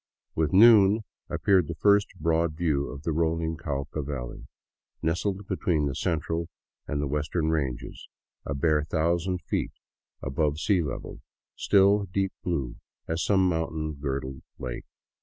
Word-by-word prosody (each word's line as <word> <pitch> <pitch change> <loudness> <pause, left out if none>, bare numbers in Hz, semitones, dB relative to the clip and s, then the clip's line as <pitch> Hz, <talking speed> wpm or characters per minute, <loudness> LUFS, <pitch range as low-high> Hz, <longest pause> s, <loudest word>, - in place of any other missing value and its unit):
With 80 -2 0
noon 105 0 +7 0.3
ap - - -4
peared 95 -5 +4
the 85 - -4
first 100 +4 +4
broad 80 0 +1
view 75 -4 0
of 70 0 -8
the 80 - -1
rolling 80 +1 0
Cauca 75 +1 -4
valley, 65 -4 -6 0.6
nestled 95 +5 -1
between 80 -5 0
the 70 - -1
central 80 +2 -2 0.4
and 75 - -2
the 70 - -1
western 75 +3 -1
ranges, 70 -6 -3 0.4
a 70 - -3
bare 75 +1 +2
thousand 85 +4 0
feet - - -2 0.5
above 75 +2 0
sea 90 +3 +2
level, 75 -4 -5 0.3
still 100 +1 +4
deep 95 +1 -1
blue 70 -9 -2 0.3
as 80 +1 -1
some 95 -2 +3
mountain 80 -2 -1
girdled 70 -2 -4 0.2
lake. 60 -2 -6
80 Hz, 140 wpm, -27 LUFS, 75-90 Hz, 0.6 s, noon